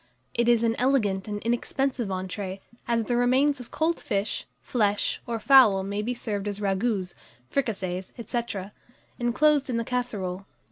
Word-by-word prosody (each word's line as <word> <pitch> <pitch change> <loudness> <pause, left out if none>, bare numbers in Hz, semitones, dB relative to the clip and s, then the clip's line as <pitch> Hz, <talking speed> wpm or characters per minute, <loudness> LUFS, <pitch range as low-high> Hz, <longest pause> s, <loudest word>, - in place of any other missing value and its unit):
It 235 0 +2
is 235 -1 +4
an 230 0 +2
elegant 220 -7 +2
and 205 -1 -3
inexpensive 240 +1 0
entrée, 190 +1 -4 0.3
as 230 -1 +2
the 240 +2 -1
remains 255 +4 +3
of 245 - -10
cold 330 +2 0
fish, 200 +1 -2
flesh, 210 -4 0
or 235 -1 -1
fowl 220 -7 +6
may 200 +2 -2
be 245 +4 -2
served 210 -4 -3
as 205 0 -3
ragoûts, 195 -1 0 0.4
fricassees, 190 -8 -2
&c., 240 - 0 0.8
inclosed 275 +4 +3
in 240 - 0
the 230 - 0
casserole. 200 -7 -3
230 Hz, 150 wpm, -26 LUFS, 200-250 Hz, 0.8 s, fowl